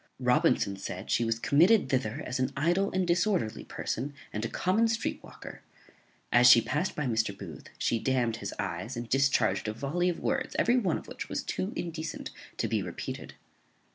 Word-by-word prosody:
Robinson 100 -1 +2
said 95 0 -6
she 120 - +3
was 115 0 0
committed 170 - +4
thither 125 -5 -1
as 125 +1 -3
an 130 - 0
idle 175 +7 +2
and 185 0 +1
disorderly 175 - +1
person, 140 +4 -4 0.2
and 105 - -3
a 115 - -2
common 215 +6 +2
street 225 0 -2
walker. - - -11 0.7
As 120 0 +7
she 120 - +9
past 150 +10 -1
by 150 - -2
Mr. 110 -5 0
Booth, 95 -5 -9
she 115 - 0
damned 120 -3 0
his 100 -3 -5
eyes, 105 +5 -4
and 120 0 -4
discharged 135 -4 +2
a 110 - -1
volley 150 +10 0
of 175 - -3
words, 270 -1 -1
every 240 +2 +3
one 190 -10 +1
of - - -10
which - - -7
was - - -2
too 95 - -3
indecent 160 -2 -5 0.3
to - - 0
be 110 -2 0
repeated. 90 -2 -6
130 Hz, 185 wpm, -29 LUFS, 110-175 Hz, 0.7 s, she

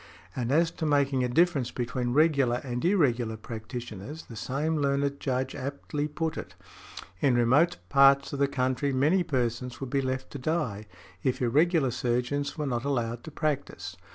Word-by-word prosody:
And 120 0 -2
as 165 +3 +3
to 165 - -4
making 140 -3 +2
a 125 - 0
difference 150 -3 +2
between 120 0 -2
regular 140 -5 +3
and 125 -2 -4
irregular 125 - +2
practitioners 115 +4 -7
the 115 - -11
same 145 +8 -1
learned 140 0 0
Judge 130 -1 -1
aptly 145 +2 -3
put 155 +2 -3
it, - - -9 0.6
"in 130 +1 +3
remote 145 +9 +4
parts 140 0 +5
of 140 - -3
the 140 - +4
country 130 +1 0
many 150 +8 +3
persons 125 -5 -2
would 135 -2 -6
be 140 -1 +2
left 130 0 -3
to 140 - -6
die 125 -8 -2 0.3
if 130 - 0
|84| - - -11
irregular 150 +2 +3
surgeons 125 +4 -1
were 150 - -2
not 120 -3 -1
allowed 120 -4 -1
to - - -6
practise." 150 -2 -3
135 Hz, 170 wpm, -28 LUFS, 125-150 Hz, 0.6 s, parts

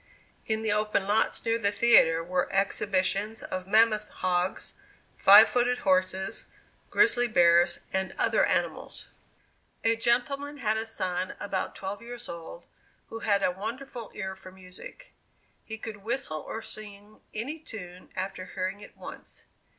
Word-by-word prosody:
In 220 0 0
the 220 - +1
open 210 -2 +1
lots 205 +2 +1
near 230 0 +1
the 200 -2 +2
theatre 165 -7 +5
were 180 +1 -1
exhibitions 195 +2 0
of 185 0 -5
mammoth 215 0 +3
hogs, 180 0 -1 0.5
five 205 +3 +9
footed 245 0 +1
horses, 185 0 +1 0.4
grizzly 250 -13 +4
bears, 175 -4 +4
and 190 0 -1
other - - +3
animals. - - -1 0.7
A 225 0 +3
gentleman 275 +5 0
had 220 -5 0
a 220 +1 -2
son 185 -4 -2
about 195 -2 -3
twelve 200 +2 -5
years 240 +1 -8
old, 170 0 -8 0.4
who 225 - -6
had 200 -3 +1
a - - +3
wonderful 230 +5 -6
ear 190 -1 -4
for 185 -1 -12
music. 185 - -11 0.5
He 220 - -7
could 220 -1 -7
whistle 205 -6 -3
or 225 - -6
sing 210 0 -11
any 270 +9 -3
tune 180 - -10
after 190 -1 -4
hearing 190 +1 -2
it - - -13
once. - - -9
205 Hz, 145 wpm, -28 LUFS, 185-225 Hz, 0.7 s, five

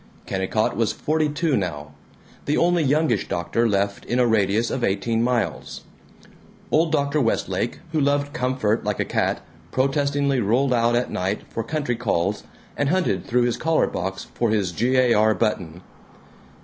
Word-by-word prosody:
Kennicott 95 +3 -1
was 115 -2 0
forty 155 0 0
two 150 0 0
now; 75 -7 -3 0.5
the 145 - +1
only 175 0 +3
youngish 145 - +1
doctor 115 +7 0
left 100 0 -1
in 120 - -1
a 125 - +4
radius 110 0 +1
of 130 - -2
eighteen 115 +3 0
miles. 120 0 -1 0.9
Old 160 +1 +3
Dr. 140 -1 +1
Westlake, 115 -2 -1
who 160 - 0
loved 145 0 +1
comfort 125 -4 0
like 105 -1 -2
a - - +1
cat, - - -1 0.3
protestingly 140 0 +1
rolled 125 +5 +2
out 120 0 +2
at 120 +1 0
night 95 +3 -2
for 115 - -3
country 140 0 -2
calls, 105 -4 -1 0.3
and 140 -1 0
hunted 170 - 0
through 125 +1 +2
his 120 -1 0
collar 160 0 +2
box 95 +2 -4
for 120 - 0
his 105 -4 0
G. 120 +9 0
A. 125 -2 +4
R. 110 +1 +3
button. 90 -6 -2
120 Hz, 160 wpm, -23 LUFS, 105-140 Hz, 0.9 s, a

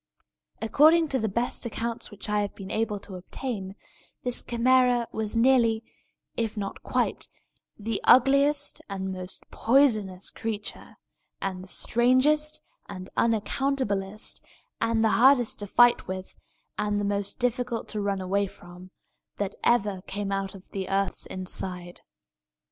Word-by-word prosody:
According 315 +7 +5
to 265 - +1
the 220 -1 -1
best 235 +5 -2
accounts 235 0 -3
which 205 0 -8
I 210 0 +1
have 205 - -4
been 195 0 -8
able 215 -2 -1
to 200 - -11
obtain, 195 0 -5 0.5
this 245 -1 +2
Chimæra 245 0 +3
was 220 +1 -2
nearly, 230 -2 +4 0.5
if 225 -2 -2
not 200 -1 -4
quite, - - -1 0.5
the 220 0 -2
ugliest 275 +3 +4
and 190 -1 -3
most 185 0 -7
poisonous 215 -8 +2
creature, 215 -2 -5 0.4
and 185 -1 -4
the - - -12
strangest 260 +9 +2 0.3
and 185 -2 -8
unaccountablest, 220 -3 -1 0.4
and 230 -1 +2
the - - +4
hardest 245 +1 +4
to 205 - -4
fight 240 +4 +4
with, 185 0 -6 0.4
and 210 0 0
the 205 - -1
most 200 0 -2
difficult 245 -1 -1
to 210 - -3
run 200 -1 -1
away 195 +2 0
from, 180 0 -13 0.5
that 200 -1 -2
ever 205 -5 +2
came 200 0 -3
out 195 0 -2
of 190 - -15
the 190 -2 -4
earth's 195 0 -1
inside. 180 -1 -5
215 Hz, 135 wpm, -27 LUFS, 195-245 Hz, 0.5 s, According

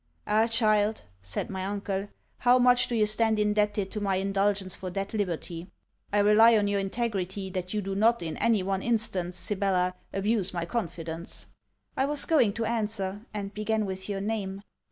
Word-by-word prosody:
'Ah! 220 +2 +3
child!' 215 -2 +2 0.2
said 95 - -4
my 190 -1 -3
uncle, 200 0 -3 0.3
'how 250 +1 +5
much 250 0 +4
do 240 - -2
you 215 -2 +4
stand 220 +1 +1
indebted 210 -1 +1
to 210 - -4
my 195 -2 +1
indulgence 195 0 0
for 185 - -5
that 195 +3 -4
liberty? 175 -4 -3 0.4
I 205 - +1
rely 220 +2 +6
on 205 -1 +2
your 200 0 +1
integrity 195 -2 -2
that 185 0 -4
you 210 - -1
do 195 +1 -3
not 220 +1 +3
in 160 -1 -3
any 220 -5 +2
one 195 0 -1
instance, 195 -7 -1
Sibella, 185 -2 0 0.2
abuse 200 -1 0
my 170 -1 -1
confidence.' 170 -5 -5 0.5
I 270 - +1
was 295 0 +1
going 245 -11 +3
to 230 +1 -2
answer, 210 -2 -2
and 205 -1 -5
began 215 0 0
with 190 0 -5
your 195 -1 -2
name. 200 -2 -3
205 Hz, 175 wpm, -28 LUFS, 190-220 Hz, 0.5 s, rely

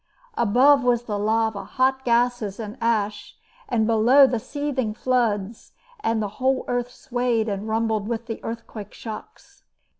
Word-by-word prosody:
Above 255 +5 +4
was 245 -1 +2
the 215 -3 -4
lava, 220 0 0
hot 265 0 0
gases 235 -4 +1
and 215 -1 -6
ash, 215 -3 -1 0.3
and 225 -3 +2
below 230 +5 +6
the 250 -3 0
seething 265 -4 -3
floods, 225 -4 -1 0.3
and 225 - 0
the - - -1
whole 260 0 +1
earth 245 0 -1
swayed 245 -2 -1
and 205 0 -3
rumbled 220 -1 0
with 235 0 -3
the 225 -2 -6
earthquake 225 -2 -7
shocks. 220 -2 -10
230 Hz, 145 wpm, -23 LUFS, 215-250 Hz, 0.3 s, below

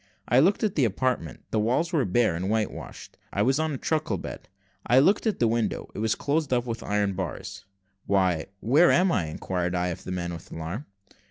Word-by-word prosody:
I 125 - +5
looked 190 +10 +3
at 210 -3 +1
the 145 - +2
apartment: 115 - -1
the 110 - +1
walls 130 - +1
were 145 -7 +2
bare 105 -1 +2
and 90 +3 -2
white 110 -1 +1
washed. - - -10
I - - +1
was 135 +3 +2
on 160 0 0
a 140 - -3
truckle 150 -8 -1
bed. - - -8 0.3
I 125 - +3
looked 195 - +4
at 215 - +1
the 120 - +3
window 115 -1 -1
it - - -6
was 110 0 +1
closed 145 0 -1
up 120 -1 +2
with 115 -1 -4
iron 105 -1 0
bars. 95 0 -5 0.4
"Why, 90 -5 +2
where 145 +10 +5
am 185 +1 +4
I?" 90 - 0
inquired 90 +3 -2
I 90 0 0
of 90 +1 -6
the - - -6
man, 85 -1 -3
with 85 - -10
alarm. 85 - -5
110 Hz, 220 wpm, -26 LUFS, 90-140 Hz, 0.4 s, I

